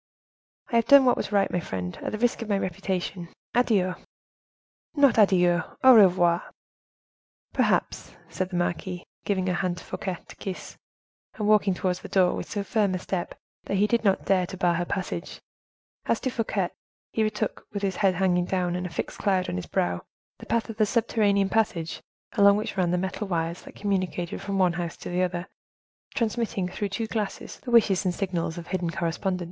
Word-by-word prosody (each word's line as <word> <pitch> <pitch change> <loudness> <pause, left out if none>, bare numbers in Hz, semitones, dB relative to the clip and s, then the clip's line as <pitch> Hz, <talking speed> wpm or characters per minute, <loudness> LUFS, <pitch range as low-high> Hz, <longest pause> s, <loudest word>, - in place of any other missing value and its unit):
"I 235 - +3
have 230 0 +2
done 280 -1 +8
what 250 - +5
was - - -4
right, 200 -1 +2
my 180 - 0
friend, 90 - -4
at - - -3
the 215 - -3
risk 240 +1 +1
of 225 - -5
my 200 - +2
reputation. 185 -1 -3 0.2
Adieu!" 205 -7 +2 1.0
"Not 280 -6 +5
adieu, 180 -4 +4 0.2
au 260 0 +9
revoir!" 180 -5 +5 1.1
"Perhaps," - - 0
said 185 -1 -3
the 185 - -5
marquise, 175 +1 -2 0.2
giving 190 -2 0
her 185 - +1
hand 175 0 -1
to - - -9
Fouquet 185 -3 -4
to - - -12
kiss, 190 -2 -6 0.6
and 210 -3 -2
walking 210 -3 +4
towards 180 0 -1
the - - -10
door 185 -2 +3
with - - -5
so 205 -2 -2
firm 200 -3 +1
a - - 0
step, 180 -1 -4 0.3
that 200 - -1
he 205 - +4
did 235 +2 +1
not 195 -3 +2
dare 185 -2 +2
to 190 - -7
bar 175 -2 +2
her 175 +1 -1
passage. 185 -2 -4 0.7
As - - +2
to 260 - -1
Fouquet, 215 -6 -1 0.4
he 225 - 0
retook, 215 -1 -2
with 200 -1 -4
his 190 -2 -1
head 195 -3 +3
hanging 180 -1 +2
down 180 -1 -1
and 180 0 -2
a - - -8
fixed 165 - -5
cloud 190 -3 +1
on - - -3
his 90 - -4
brow, 90 0 0 0.4
the - - -11
path 230 -1 0
of 225 -2 -7
the 215 - +4
subterranean 210 -4 +2
passage 205 -7 0 0.3
along 200 -2 +6
which 215 - -3
ran 185 -3 +1
the 180 - +1
metal 190 +3 -3
wires 170 -1 -2
that - - -13
communicated 185 -4 -2
from 200 -1 -3
one 180 -2 +3
house 170 -1 -4
to - - -7
the 180 +1 0
other, 180 -1 -1 0.7
transmitting, 220 -4 -1
through 200 +2 -3
two 195 +4 -2
glasses, 215 -2 -4
the 255 - -8
wishes 215 -6 +4
and 180 -2 0
signals 175 -3 -2
of 170 - -6
hidden 180 -2 -2
correspondents. 170 +3 -1
190 Hz, 195 wpm, -26 LUFS, 175-210 Hz, 1.1 s, au